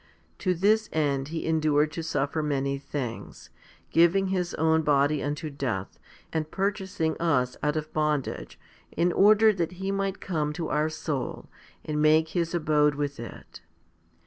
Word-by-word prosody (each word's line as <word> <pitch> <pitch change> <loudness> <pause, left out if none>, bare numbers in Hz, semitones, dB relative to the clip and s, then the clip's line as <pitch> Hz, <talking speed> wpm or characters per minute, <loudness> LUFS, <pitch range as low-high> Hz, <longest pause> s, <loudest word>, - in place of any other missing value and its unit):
2 185 -2 +1
To - - -11
this 215 +2 +3
end 140 -3 0
He 160 +1 -4
endured 155 -2 +2
to 165 - -4
suffer 150 -1 -1
many 140 -2 -1
things, 130 -5 -6 0.4
giving 180 +3 +4
His 180 -2 -1
own 160 +1 +3
body 145 0 +2
unto 150 +2 -3
death, 125 -9 -4 0.3
and 155 -1 -1
purchasing 190 -5 -1
us 125 -7 +1
out 150 +1 0
of 155 0 -4
bondage, 150 -3 -2 0.3
in 175 +1 +1
order 215 +3 +6
that 175 -2 -2
He 190 +2 -3
might 195 -1 -2
come 155 -5 -2
to 165 0 -4
our 150 +1 +1
soul 150 -4 -4 0.3
and 150 -1 -1
make 155 +1 +4
His 170 -1 -1
abode 150 -3 +2
with 145 -2 -3
it. 115 - -10
155 Hz, 155 wpm, -27 LUFS, 145-175 Hz, 0.4 s, order